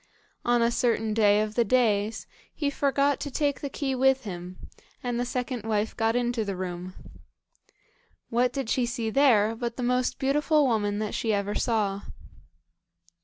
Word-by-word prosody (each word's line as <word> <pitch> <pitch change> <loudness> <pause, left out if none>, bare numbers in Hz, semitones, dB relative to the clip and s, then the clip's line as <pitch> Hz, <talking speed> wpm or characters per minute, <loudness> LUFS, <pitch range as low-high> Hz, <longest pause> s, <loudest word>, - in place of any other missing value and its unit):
On 240 -1 +3
a 235 - +2
certain 225 -3 0
day 210 -1 +4
of 215 0 -2
the 235 - +3
days 220 -2 +1 0.3
he 290 -2 -1
forgot 280 0 +1
to 290 - -4
take 285 0 -1
the 280 - -3
key 270 -1 -2
with 265 +1 +3
him, 180 -2 -7 0.5
and 245 -1 -2
the 245 - 0
second 250 -1 -3
wife 215 0 -1
got 225 +1 +1
into 240 -2 0
the 200 -2 -3
room. 180 0 -5 1.4
What 245 +2 +2
did 270 -4 -3
she 245 +1 +1
see 235 -2 -3
there 225 -5 +4
but 235 0 -4
the 250 - -3
most 250 +1 0
beautiful 295 +2 +2
woman 205 -4 0
that 215 0 -3
she 225 - -1
ever 200 0 -1
saw. 205 -4 0
235 Hz, 170 wpm, -27 LUFS, 210-260 Hz, 1.4 s, day